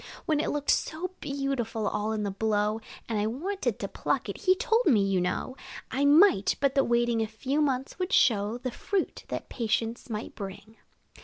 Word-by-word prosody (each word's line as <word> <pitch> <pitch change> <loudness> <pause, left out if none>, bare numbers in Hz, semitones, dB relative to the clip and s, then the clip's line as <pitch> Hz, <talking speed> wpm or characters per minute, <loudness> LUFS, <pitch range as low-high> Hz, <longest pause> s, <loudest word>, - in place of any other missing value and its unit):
When 305 -2 +1
it - - 0
looked 290 -1 +1
so 345 +4 -1
beautiful, 275 -6 -2
all 210 +1 -1
in 215 -1 -1
the 200 - -1
blow, 210 +1 0 0.3
And 220 -2 -1
I 210 - +1
wanted 360 - -2
to - - -4
pluck - - -1
it, - - -3
he 370 0 +4
told 450 +5 +2
me, 220 -10 +5
you 195 -2 +1
know, 180 +8 -2 0.4
I 280 +2 +1
might, 290 - +5
but 275 -1 +2
that 275 -1 +3
waiting 235 -1 +2
a 220 - 0
few 265 +7 -1
months 270 +2 -1
would 365 +1 -2
show 215 -1 +3
The 255 0 -4
fruit, 390 +9 -2
that - - -5
patience 230 +1 -2
might 215 0 -5
bring. 205 +2 -8
240 Hz, 190 wpm, -28 LUFS, 215-285 Hz, 0.4 s, me